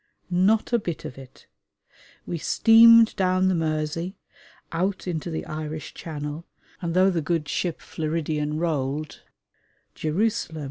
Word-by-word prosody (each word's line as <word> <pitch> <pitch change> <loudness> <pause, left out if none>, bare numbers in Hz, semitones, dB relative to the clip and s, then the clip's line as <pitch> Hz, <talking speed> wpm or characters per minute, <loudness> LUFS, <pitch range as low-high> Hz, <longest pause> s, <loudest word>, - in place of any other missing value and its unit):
Not 200 +6 +2
a 235 - +4
bit 170 -6 -5
of 130 - -8
it. 130 -1 -15 0.8
We 170 - -4
steamed 230 +5 +6
down 185 -1 +2
the - - +2
Mersey, 160 +2 -2 0.6
out 185 +3 -1
into 170 -1 -3
the 160 - -4
Irish 155 0 -6
Channel, 150 0 -6 0.4
and 170 -1 -3
though 190 +1 +5
the 170 -3 -1
good 160 0 -1
ship 175 -3 -2
Floridian 155 -1 -3
rolled 155 -2 -2 0.7
(Jerusalem! 165 0 -1
165 Hz, 130 wpm, -25 LUFS, 155-185 Hz, 0.8 s, steamed